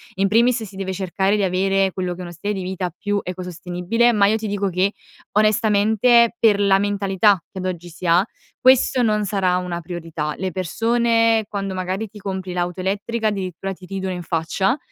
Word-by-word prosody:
In 195 Hz, +1 st, +2 dB
primis 230 Hz, +3 st, +3 dB
si 200 Hz, -2 st, -10 dB
deve 190 Hz, 0 st, -4 dB
cercare 190 Hz, +2 st, 0 dB
di 205 Hz, -, 0 dB
avere 195 Hz, +1 st, +1 dB
quello 180 Hz, -1 st, -2 dB
che -, -, -14 dB
è -, -, -5 dB
uno 175 Hz, -, -7 dB
stile 195 Hz, +5 st, -4 dB
di 190 Hz, -2 st, -4 dB
vita 185 Hz, 0 st, -3 dB
più 205 Hz, 0 st, -1 dB
ecosostenibile, 180 Hz, +5 st, -1 dB
ma 210 Hz, -3 st, +3 dB
io 215 Hz, -, +2 dB
ti 220 Hz, 0 st, -3 dB
dico 200 Hz, -1 st, -1 dB
che, 185 Hz, +2 st, +1 dB, 0.5 s
onestamente 220 Hz, +2 st, +4 dB
per 215 Hz, -4 st, +4 dB
la 200 Hz, -1 st, +4 dB
mentalità 200 Hz, -1 st, +2 dB
che 190 Hz, -, -8 dB
ad 185 Hz, -, -4 dB
oggi 175 Hz, -2 st, -4 dB
si 175 Hz, +2 st, -10 dB
ha, 175 Hz, +3 st, +4 dB, 0.3 s
questo 260 Hz, 0 st, +4 dB
non 210 Hz, -2 st, +1 dB
sarà 190 Hz, -2 st, +1 dB
una 180 Hz, -1 st, -3 dB
priorità. 165 Hz, -3 st, -5 dB
Le 190 Hz, -1 st, -3 dB
persone 230 Hz, +4 st, +1 dB
quando 195 Hz, -2 st, -4 dB
magari 185 Hz, +3 st, -3 dB
ti 210 Hz, -, -13 dB
compri 190 Hz, -2 st, -5 dB
l'auto 180 Hz, +1 st, -2 dB
elettrica 205 Hz, +4 st, -1 dB
addirittura 195 Hz, -2 st, -3 dB
ti 185 Hz, -1 st, -10 dB
ridono 190 Hz, 0 st, -4 dB
in 180 Hz, -, -5 dB
faccia, 175 Hz, -, 0 dB
195 Hz, 195 wpm, -21 LUFS, 180-210 Hz, 0.5 s, onestamente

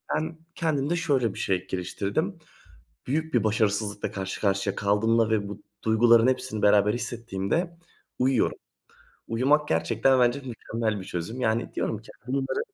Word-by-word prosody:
ben 160 Hz, +1 st, -2 dB, 0.2 s
kendimde 155 Hz, -1 st, 0 dB
şöyle 140 Hz, -, +1 dB
bir -, -, -8 dB
şey 95 Hz, -2 st, -1 dB
geliştirdim. 100 Hz, -, -2 dB, 0.7 s
Büyük 160 Hz, +4 st, -1 dB
bir -, -, +3 dB
başarısızlıkla 105 Hz, -1 st, 0 dB
karşı 95 Hz, -1 st, -5 dB
karşıya 100 Hz, -1 st, +1 dB
kaldığımda 110 Hz, +3 st, +2 dB
ve 105 Hz, -2 st, +1 dB
bu 105 Hz, 0 st, -8 dB, 0.2 s
duyguların 115 Hz, +1 st, +5 dB
hepsini 130 Hz, -4 st, -1 dB
beraber 105 Hz, 0 st, +5 dB
hissettiğimde 120 Hz, -, -2 dB, 0.4 s
uyuyorum. 130 Hz, -2 st, +2 dB, 0.7 s
Uyumak 140 Hz, +6 st, +2 dB
gerçekten 115 Hz, +11 st, +2 dB
bence 120 Hz, +2 st, +3 dB
mükemmel 115 Hz, -3 st, -3 dB
bir 95 Hz, -, -8 dB
çözüm. 95 Hz, +9 st, -5 dB
Yani, 115 Hz, -1 st, 0 dB
diyorum 110 Hz, -, -1 dB
ki -, -, -18 dB, 0.2 s
bunları 135 Hz, 0 st, -1 dB
115 Hz, 135 wpm, -26 LUFS, 105-135 Hz, 0.7 s, duyguların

